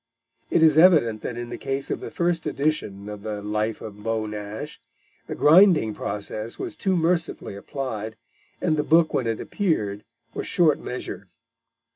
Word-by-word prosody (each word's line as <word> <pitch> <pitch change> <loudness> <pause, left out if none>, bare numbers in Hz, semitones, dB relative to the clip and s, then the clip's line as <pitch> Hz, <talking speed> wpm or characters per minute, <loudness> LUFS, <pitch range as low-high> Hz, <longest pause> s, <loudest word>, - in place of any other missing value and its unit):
It 160 - +3
is 155 -1 +6
evident 150 - +5
that 120 - -5
in 120 0 -5
the - - -6
case 135 0 -3
of - - -1
the - - -7
first 170 -1 -1
edition 120 -9 -2
of 105 -1 -7
the 105 -1 -4
Life 105 +1 -2
of 105 -1 -9
Beau 110 0 -1
Nash, 105 +7 -7 0.5
the - - -4
grinding 160 - +6
process 105 +2 -5
was 350 -3 -5
too 190 -2 0
mercifully 165 - 0
applied, 110 -2 -5 0.4
and 155 - +1
the 150 - +1
book 160 +1 +4
when 125 - 0
it 115 -1 -1
appeared 105 - -1 0.3
was - - -4
short 160 -6 +3
measure. 125 -5 -6
120 Hz, 165 wpm, -24 LUFS, 105-160 Hz, 0.5 s, is